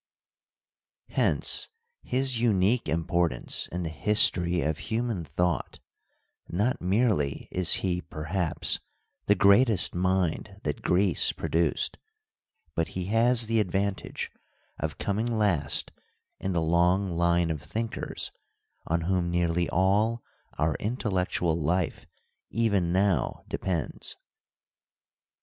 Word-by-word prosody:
Hence - - +1 0.3
his 130 -2 +1
unique 110 -2 +2
importance 85 +1 0
in 90 +1 -4
the 80 - -3
history 90 0 +4
of 75 +2 -1
human 115 -5 -1
thought: 85 +3 -2 0.7
not 105 +9 0
merely 95 - 0
is 90 -2 +1
he, 90 -1 0
perhaps, 80 +2 -1 0.5
the 105 - +5
greatest 100 +2 +5
mind 95 +2 -1
that 75 - -3
Greece 90 -1 +3
produced, 80 -1 -1 0.7
but 80 +1 -1
he 90 - -2
has 115 +1 +4
the 115 0 +1
advantage 100 0 -2 0.5
of - - -3
coming 105 +3 -1
last 100 -11 +1 0.5
in 95 - -2
the 85 - +1
long 90 +4 +2
line 85 0 +1
of 75 -3 -4
thinkers 110 +9 -4 0.6
on 85 +1 0
whom 90 0 0
nearly 85 0 0
all 105 +6 +1 0.3
our 75 0 +1
intellectual 95 -7 -1
life 85 +2 -1 0.4
even 100 -7 +1
now 95 -6 0
depends. 85 -5 -3
90 Hz, 105 wpm, -27 LUFS, 85-105 Hz, 0.7 s, the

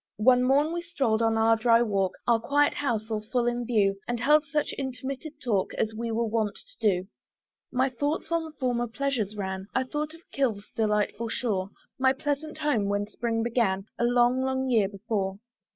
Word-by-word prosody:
One 250 +4 +5
morn 280 +5 +3
we 345 - -2
stroll'd 270 -11 0
on 225 -1 +2
our 225 0 +5
dry 230 +1 +4
walk, 195 -4 0
Our 235 -1 +4
quiet 290 +5 +2
house 225 -5 -2
all 215 -1 -1
full 240 +3 -1
in 240 0 -1
view, 200 -5 +2
And 240 -1 -1
held 300 +5 +4
such 300 0 -1
intermitted 275 +3 -5
talk 210 -6 0
As 220 0 -1
we 230 +1 -3
are - - -2
wont 225 -2 0
to - - -13
do. 190 -4 +1 0.6
My 260 +2 +2
thoughts 290 +6 -2
on 325 -2 -1
former 245 -4 -1
pleasures 235 -4 -2
ran; 190 -1 -4
I 260 - +3
thought 300 +4 -4
of 330 - -16
Kilve's 225 -7 -1
delightful 215 +1 0
shore, 200 -5 -1 0.3
My 260 0 +4
pleasant 290 +2 -3
home, 295 -9 +1
when 205 0 0
spring 225 +2 -2
began, 220 -5 +1
A - - +1
long, 245 +1 +3
long 265 0 0
year 215 -5 +3
before. 195 -1 -3
240 Hz, 185 wpm, -27 LUFS, 215-270 Hz, 0.6 s, One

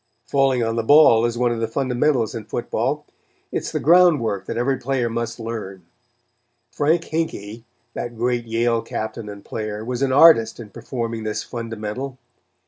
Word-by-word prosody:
Falling 135 -3 +2
on 115 0 -1
the - - +2
ball 120 -4 +6
is 120 0 -2
one 120 0 +2
of 115 - -2
the 115 - -1
fundamentals 125 0 0
in 115 -3 -6
football. - - -2 0.5
It - - 0
is - - -6
the - - -1
ground 175 0 +5
work 100 -5 -3
that - - -4
every 130 +3 +1
player 125 -3 -1
must 115 +1 -3
learn. 105 -6 -6 0.9
Frank 160 +3 +1
Hinkey, 115 -10 -4 0.3
that 120 -1 -5
great 120 0 0
Yale 115 0 +1
Captain 110 -1 -5
and 100 -1 -10
player, 110 -1 -5
was 125 +1 -3
an 135 -1 +1
artist 130 -7 +6
in 110 -3 -10
performing 115 -3 -4
this 110 -1 -3
fundamental. 115 +2 -5
115 Hz, 170 wpm, -22 LUFS, 110-130 Hz, 0.9 s, ball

